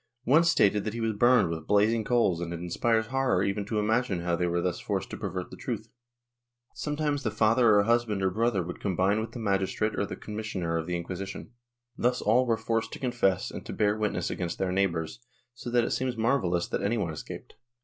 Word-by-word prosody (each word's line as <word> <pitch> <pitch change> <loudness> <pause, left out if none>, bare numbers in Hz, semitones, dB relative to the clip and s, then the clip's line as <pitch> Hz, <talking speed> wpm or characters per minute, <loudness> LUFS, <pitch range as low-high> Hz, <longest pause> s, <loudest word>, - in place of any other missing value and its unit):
One 150 +7 +5
stated 105 -11 +3
that 110 +2 -4
he - - -4
was 115 -1 0
burned 115 -3 +4
with 80 -1 -5
blazing 110 +2 +3
coals 105 -7 +2
and 85 -1 -4
it 85 - -4
inspires 110 +6 0
horror 130 -5 +1
even 100 +1 -1
to 110 +1 -2
imagine 105 -3 +1
how 85 0 0
they 90 +1 0
were 85 0 0
thus 90 0 -1
forced - - -3
to - - -5
pervert - - -5
the - - -8
truth. - - -5 0.8
Sometimes 150 -1 -2
the - - -1
father 110 0 +4
or 100 - +5
husband 115 -3 +1
or 95 - +2
brother 110 -2 +1
would 90 +1 -7
combine 95 +2 +1
with 110 - -6
the - - -6
magistrate 105 0 0
or 100 - -1
the - - -5
commissioner 105 -6 -4
of 80 0 -2
the 90 - -1
Inquisition. 95 +5 -6 0.4
Thus 125 +1 +1
all 125 +4 +3
were 115 -1 +2
forced 115 0 -1
to - - -7
confess 120 -8 0
and - - -7
to - - -7
bear 105 0 +2
witness 110 -1 -1
against 85 -2 -3
their 95 -1 -1
neighbors, 90 -1 -1 0.3
so 120 0 -7
that 120 0 +3
it - - -2
seems 130 -2 -1
marvellous 110 -8 +1
that - - -2
any 115 +4 0
one 85 -7 -2
escaped. 75 - -8
105 Hz, 220 wpm, -28 LUFS, 90-120 Hz, 0.8 s, One